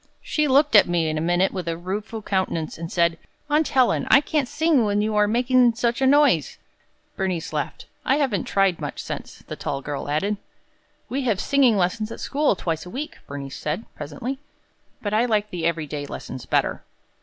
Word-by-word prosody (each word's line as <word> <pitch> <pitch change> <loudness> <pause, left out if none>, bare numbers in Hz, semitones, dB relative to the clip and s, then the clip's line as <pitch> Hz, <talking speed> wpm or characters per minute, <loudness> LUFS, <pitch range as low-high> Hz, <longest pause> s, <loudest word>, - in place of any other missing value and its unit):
She 305 -1 0
looked 280 -1 +4
at 205 - +8
me 170 -2 +1
in 155 - -2
a - - -2
minute 175 +3 +2
with 180 -3 -4
a 165 0 -1
rueful 205 +5 -5
countenance, 185 -5 -1
and 165 0 -6
said, 170 -2 +2 0.3
'Aunt 305 +1 +3
Helen, 260 -2 +2
I 270 - +8
can't 295 -2 -1
sing 310 -2 +2
when 205 -1 +1
you 215 +1 0
are 210 0 +4
making 245 +1 +3
such 235 +1 0
a 265 - +4
noise!'" 275 - +4 0.6
Bernice 185 -4 -2
laughed. - - -3 0.2
"I 265 - +3
haven't 260 - 0
tried 195 -3 +1
much - - -5
since," - - -7
the - - -6
tall 135 -1 -4
girl 145 0 -4
added. 200 +8 0 0.7
"We 265 +4 -2
have 215 -6 +1
singing 260 -3 +3
lessons 215 +4 0
at - - -7
school 290 -6 +1
twice 165 -3 -3
a 180 - -10
week," 280 - -6
Bernice 140 -1 -6
said, 155 +9 -3
presently, 160 - -5 0.6
"but 205 -1 -2
I 225 +3 +3
like 210 -3 0
the 170 -2 -1
every 165 -2 -1
day 145 0 -5
lessons 130 -2 -7
better." - - +1
205 Hz, 195 wpm, -23 LUFS, 170-255 Hz, 0.7 s, at